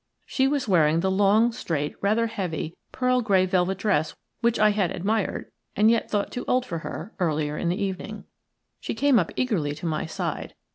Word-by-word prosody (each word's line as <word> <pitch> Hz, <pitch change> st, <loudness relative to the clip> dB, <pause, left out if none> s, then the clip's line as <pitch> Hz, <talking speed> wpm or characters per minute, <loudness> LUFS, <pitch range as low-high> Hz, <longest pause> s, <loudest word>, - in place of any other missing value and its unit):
She 265 Hz, 0 st, +1 dB
was 280 Hz, -3 st, 0 dB
wearing 165 Hz, -4 st, +3 dB
the 190 Hz, +1 st, +1 dB
long, 205 Hz, +4 st, +4 dB
straight, 160 Hz, -, -3 dB
rather 215 Hz, +3 st, +2 dB
heavy, 180 Hz, -8 st, -4 dB, 0.2 s
pearl 250 Hz, 0 st, +1 dB
grey 195 Hz, -5 st, +3 dB
velvet 185 Hz, 0 st, +1 dB
dress 190 Hz, -7 st, 0 dB, 0.2 s
which 235 Hz, -1 st, +2 dB
I 215 Hz, 0 st, +5 dB
had 200 Hz, -4 st, +1 dB
admired, 200 Hz, +4 st, -2 dB, 0.2 s
and 215 Hz, +2 st, +5 dB
yet 230 Hz, -, 0 dB
thought 205 Hz, -1 st, -1 dB
too 245 Hz, -, -4 dB
old 255 Hz, 0 st, +2 dB
for 170 Hz, -8 st, -4 dB
her, 190 Hz, +5 st, -7 dB
earlier 155 Hz, -4 st, 0 dB
in 170 Hz, -, -1 dB
the 180 Hz, +4 st, -1 dB
evening. 200 Hz, +2 st, -4 dB, 0.6 s
She -, -, -4 dB
came 280 Hz, -4 st, +4 dB
up 170 Hz, -, -1 dB
eagerly 170 Hz, -, 0 dB
to 155 Hz, -, -8 dB
my 155 Hz, -1 st, -1 dB
side. 160 Hz, -, -4 dB
195 Hz, 190 wpm, -25 LUFS, 170-225 Hz, 0.6 s, I